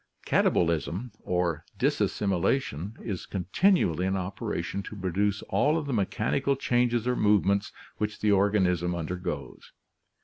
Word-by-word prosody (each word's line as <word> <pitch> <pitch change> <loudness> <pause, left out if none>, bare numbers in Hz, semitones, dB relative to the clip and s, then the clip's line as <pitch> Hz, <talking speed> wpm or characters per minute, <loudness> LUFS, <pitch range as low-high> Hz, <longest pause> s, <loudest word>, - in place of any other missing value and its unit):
Katabolism 85 +7 +1
or 85 -3 -1
disassimilation 100 - 0
is 100 -6 -4
continually 95 - +2
in 95 0 0
operation 95 0 -3
to 105 - -9
pro 95 -2 -3
duce 100 +3 0
all 140 +11 +2
of 160 - -3
the 140 - -2
mechanical 120 +6 0
changes 120 -2 +1
or 125 - +2
movements 100 -2 +2 0.3
which 105 0 -3
the 105 - +2
organ 100 0 +3
ism 90 -1 0
undergoes. 90 +2 -5
100 Hz, 130 wpm, -28 LUFS, 90-115 Hz, 0.3 s, organ